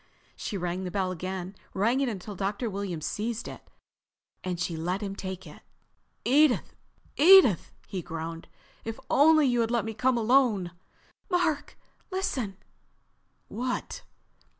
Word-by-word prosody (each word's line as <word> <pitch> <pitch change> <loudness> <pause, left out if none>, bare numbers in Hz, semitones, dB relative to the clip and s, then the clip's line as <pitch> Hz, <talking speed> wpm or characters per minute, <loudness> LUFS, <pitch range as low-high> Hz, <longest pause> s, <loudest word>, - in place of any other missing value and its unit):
She 205 - -4
rang 180 +1 -2
the 185 - -3
bell 185 0 -1
again, 185 +2 -5 0.2
rang 230 +7 +2
it 270 - +1
until 205 -1 -6
Dr. 205 +4 -2
Williams 190 -5 -4
seized 225 +2 -3
it, - - -8 0.8
then 180 -1 -2
she 170 -1 -2
let 175 +5 -2
him 195 -1 -4
take 190 -1 -6
it. 150 - -12 0.6
"Edith, 285 +1 +4 0.4
Edith," 325 - +7 0.2
he 190 - -4
groaned. 165 0 -6 0.4
"If 225 +2 -5
only 310 +1 +6
you 245 -2 +2
had 225 - 0
let 235 -2 +1
me 225 - -4
come 250 +3 +2
alone...." 225 -6 +3 0.6
"Mark, 350 -5 0 0.3
listen!" 260 - -2 0.9
"What?" 250 - -3
210 Hz, 135 wpm, -28 LUFS, 185-255 Hz, 0.9 s, Edith